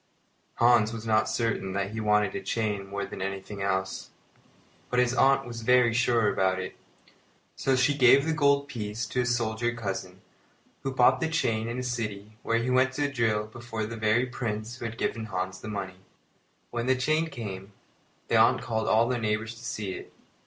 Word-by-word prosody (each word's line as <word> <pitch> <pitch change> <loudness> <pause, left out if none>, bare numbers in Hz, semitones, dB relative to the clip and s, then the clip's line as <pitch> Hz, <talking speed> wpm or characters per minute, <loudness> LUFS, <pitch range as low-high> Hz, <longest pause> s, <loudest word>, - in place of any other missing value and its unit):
Hans 115 -2 +4
was 115 -1 -7
not 110 -1 +2
certain 115 -5 -1
that 100 0 -2
he 110 - -4
wanted 105 -1 +2
a - - -4
chain 105 -1 -2
more 100 0 -3
than - - -8
anything 95 +1 -5
else, 95 -1 -2 0.8
but 125 - -1
his 125 0 +3
aunt 135 +1 +4
was 120 -1 -7
very 125 0 +4
sure 120 -2 +2
about 95 -2 +1
it; 95 0 -5 0.8
so 135 - +1
she 130 +3 +3
gave 135 +1 +6
the 160 - +1
gold 140 -2 +3
piece 110 -3 -4
to 125 +3 -1
a - - -1
soldier 120 -1 0
cousin, 95 -4 -5 0.6
who 135 - -2
bought 130 0 +4
the 160 - 0
chain 115 -8 0
in 120 +1 -4
a 125 - -3
city 110 -4 -4
where 115 - +1
he 120 +2 -1
went 130 +1 +3
to 145 +1 -1
drill 110 -4 +1
before 115 0 -5
the 115 +2 -6
very 110 +3 +2
Prince 115 -2 -4
who 120 - -6
had 115 0 -5
given 115 -2 -2
Hans 95 -2 -4
the - - -8
money. 95 -3 -5 0.7
When 120 +1 -2
the 130 - +4
chain 155 +6 +1
came, 100 -6 -7 0.5
the - - +3
aunt - - +4
called 110 -1 -2
all 115 +2 +4
the 125 -1 -1
neighbours 110 0 -1
to 115 +1 -14
see 105 -4 -4
it. - - -9
115 Hz, 195 wpm, -27 LUFS, 105-125 Hz, 0.8 s, gave